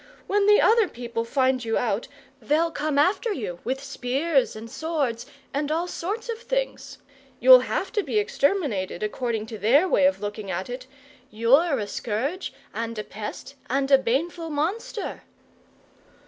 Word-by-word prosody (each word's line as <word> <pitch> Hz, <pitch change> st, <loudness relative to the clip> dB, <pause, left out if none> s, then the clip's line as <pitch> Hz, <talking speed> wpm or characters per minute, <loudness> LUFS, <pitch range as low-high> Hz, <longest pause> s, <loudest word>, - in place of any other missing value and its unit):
When 405 Hz, 0 st, +2 dB
the 420 Hz, 0 st, +7 dB
other 450 Hz, -2 st, +5 dB
people 235 Hz, -3 st, -4 dB
find 260 Hz, +1 st, +1 dB
you 225 Hz, -1 st, 0 dB
out, 225 Hz, -2 st, -1 dB, 0.3 s
they'll 310 Hz, +8 st, +1 dB
come 300 Hz, -2 st, -2 dB
after 375 Hz, +9 st, +2 dB
you 195 Hz, -, -4 dB
with 265 Hz, +3 st, -3 dB
spears 270 Hz, +1 st, 0 dB
and 220 Hz, +1 st, -8 dB
swords 270 Hz, -3 st, -2 dB, 0.3 s
and 290 Hz, +1 st, -1 dB
all 330 Hz, +3 st, 0 dB
sorts 420 Hz, +7 st, -4 dB
of 460 Hz, -1 st, -4 dB
things. -, -, -3 dB, 0.4 s
You'll -, -, +9 dB
have -, -, -2 dB
to 425 Hz, -, +1 dB
be 425 Hz, -, -2 dB
exterminated, 285 Hz, -, 0 dB
according 220 Hz, 0 st, -2 dB
to 220 Hz, -1 st, -8 dB
their 265 Hz, -, +4 dB
way 280 Hz, -5 st, +4 dB
of 285 Hz, -, 0 dB
looking 205 Hz, -1 st, -5 dB
at 185 Hz, +6 st, -3 dB
it! 250 Hz, +1 st, -7 dB, 0.4 s
You're 270 Hz, +8 st, +3 dB
a 210 Hz, -, -2 dB
scourge, 245 Hz, -, -3 dB, 0.2 s
and 230 Hz, +1 st, -4 dB
a 215 Hz, -, -3 dB
pest, 210 Hz, +6 st, -7 dB, 0.2 s
and 270 Hz, +2 st, 0 dB
a 270 Hz, -, +8 dB
baneful 325 Hz, +7 st, -1 dB
monster!" 350 Hz, +9 st, -3 dB
275 Hz, 160 wpm, -25 LUFS, 230-340 Hz, 0.4 s, You'll